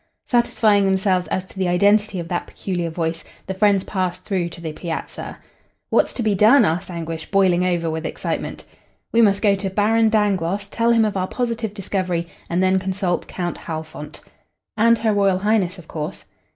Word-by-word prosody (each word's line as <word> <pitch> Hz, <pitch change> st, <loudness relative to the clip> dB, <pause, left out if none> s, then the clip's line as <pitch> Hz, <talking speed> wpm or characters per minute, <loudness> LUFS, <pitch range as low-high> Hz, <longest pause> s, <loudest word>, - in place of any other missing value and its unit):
Satisfying 215 Hz, -4 st, +3 dB
themselves 190 Hz, -1 st, +1 dB
as 185 Hz, -, -2 dB
to 190 Hz, -, -12 dB
the 185 Hz, -, +1 dB
identity 200 Hz, +2 st, +3 dB
of 170 Hz, -, -5 dB
that 175 Hz, 0 st, -3 dB
peculiar 175 Hz, -3 st, -3 dB
voice, 165 Hz, 0 st, -3 dB, 0.2 s
the 190 Hz, -, -3 dB
friends 200 Hz, -1 st, +3 dB
passed 185 Hz, -2 st, -3 dB
through 185 Hz, -4 st, -1 dB
to 170 Hz, -, -11 dB
the 160 Hz, -2 st, -5 dB
piazza. 165 Hz, 0 st, -6 dB, 0.5 s
"What's -, -, +3 dB
to 240 Hz, -, -3 dB
be 215 Hz, -2 st, +2 dB
done?" 215 Hz, +8 st, +6 dB
asked 170 Hz, +4 st, -1 dB
Anguish, 165 Hz, -2 st, -5 dB
boiling 185 Hz, -3 st, +3 dB
over 175 Hz, -2 st, 0 dB
with 160 Hz, 0 st, -3 dB
excitement. -, -, -4 dB, 0.5 s
"We 230 Hz, -, +5 dB
must 200 Hz, -2 st, +3 dB
go 205 Hz, -2 st, +5 dB
to 195 Hz, 0 st, -3 dB
Baron 220 Hz, +3 st, +3 dB
Dangloss, 200 Hz, -3 st, +1 dB
tell 230 Hz, +2 st, +1 dB
him 230 Hz, -1 st, +4 dB
of 210 Hz, -, -2 dB
our 185 Hz, -1 st, -1 dB
positive 230 Hz, -3 st, -3 dB
discovery, 185 Hz, -4 st, -2 dB, 0.2 s
and 175 Hz, +2 st, +1 dB
then 190 Hz, 0 st, +3 dB
consult 185 Hz, -1 st, -2 dB
Count 175 Hz, -2 st, -4 dB
Halfont." 155 Hz, -2 st, -7 dB, 0.5 s
"And 230 Hz, +2 st, +4 dB
Her 220 Hz, -1 st, +1 dB
Royal 195 Hz, -2 st, +3 dB
Highness, 200 Hz, -2 st, +1 dB
of 170 Hz, -3 st, -13 dB
course." 150 Hz, -2 st, -6 dB
190 Hz, 180 wpm, -21 LUFS, 175-210 Hz, 0.5 s, done